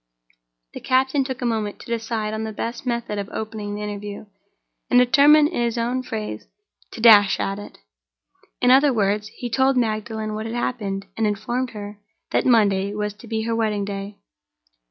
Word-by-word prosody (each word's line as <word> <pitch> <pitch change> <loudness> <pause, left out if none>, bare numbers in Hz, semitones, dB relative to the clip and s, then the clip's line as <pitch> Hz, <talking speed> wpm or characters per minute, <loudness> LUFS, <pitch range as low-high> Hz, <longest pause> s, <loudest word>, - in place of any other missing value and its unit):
The - - -7
captain 265 +2 +2
took 260 -1 -5
a - - 0
moment 220 -3 -2
to - - -12
decide 225 -2 -3
on 220 0 -3
the 220 - -4
best 235 +4 -5
method 235 -4 -2
of 200 - -5
opening 215 -2 -5
the 210 - -5
interview, 205 0 -6 0.6
and 245 - +4
determined, 290 +4 +6
in - - -2
his 235 0 -1
own 240 +2 -1
phrase, 215 - -6 0.5
to - - -8
dash 210 -4 +7
at 195 +1 -2
it. 205 - -11 0.8
In 250 - +5
two 285 -2 +3
words 210 0 +1
he 245 +3 -7
told 265 +2 +2
Magdalen 220 -1 -2
what 215 +1 -4
had 225 - -5
happened, 200 -5 -3
and 225 0 +1
informed 240 +5 -2
her 205 0 -8 0.3
that - - +1
Monday 200 -4 +3
was 210 -1 -2
to 210 +3 -15
be 220 0 -2
her 230 0 -1
wedding 215 -3 0
day. 200 0 -6
220 Hz, 180 wpm, -22 LUFS, 205-240 Hz, 0.8 s, dash